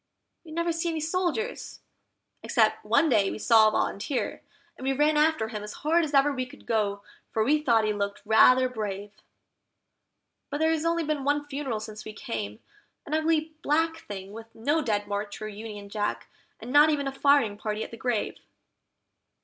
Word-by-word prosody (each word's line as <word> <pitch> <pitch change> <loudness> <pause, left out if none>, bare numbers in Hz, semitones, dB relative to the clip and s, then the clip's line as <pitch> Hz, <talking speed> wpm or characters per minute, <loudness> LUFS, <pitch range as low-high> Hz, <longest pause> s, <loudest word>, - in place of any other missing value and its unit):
We 330 - -14
never 335 +1 0
see 335 +1 -1
any 325 -1 -2
soldiers, 365 +8 -2 0.6
except - - +2
one 325 - +3
day 205 -8 +3
we - - -5
saw 220 0 +5
a - - +3
Volunteer, 245 +6 -2 0.3
and - - -11
we 270 +1 +1
ran 300 +3 +2
after 300 -7 +2
him 215 -2 -5
as 210 0 -7
hard 335 +2 +4
as 295 -2 -2
ever 280 +1 +4
we 255 -1 -3
could - - -15
go, 205 -3 0 0.3
for 220 - 0
we 300 +6 +2
thought 230 -6 +3
he 215 - +1
looked 200 0 -3
rather 255 +4 +6
brave; 205 -4 -5 1.4
But 290 - -3
there's 320 +1 +1
only 335 0 +1
been 300 -2 -2
one 290 +1 +1
funeral 275 -5 -3
since 215 0 -8
we 215 - -8
came, 105 - -5 0.5
an 295 - -6
ugly 315 0 +1
black 325 +2 +1
thing 195 -1 -7
with 225 +1 -11
no 290 +8 +1
Dead 210 -6 -1
March 205 0 -4
or 215 - -5
Union 210 -1 -8
Jack, 205 0 -3 0.3
and 235 +3 -8
not 295 +2 +7
even 285 -2 0
a - - -1
firing 275 -6 +3
party 210 +1 -3
at - - -9
the - - -7
grave. 235 -2 -2
255 Hz, 185 wpm, -27 LUFS, 215-305 Hz, 1.4 s, not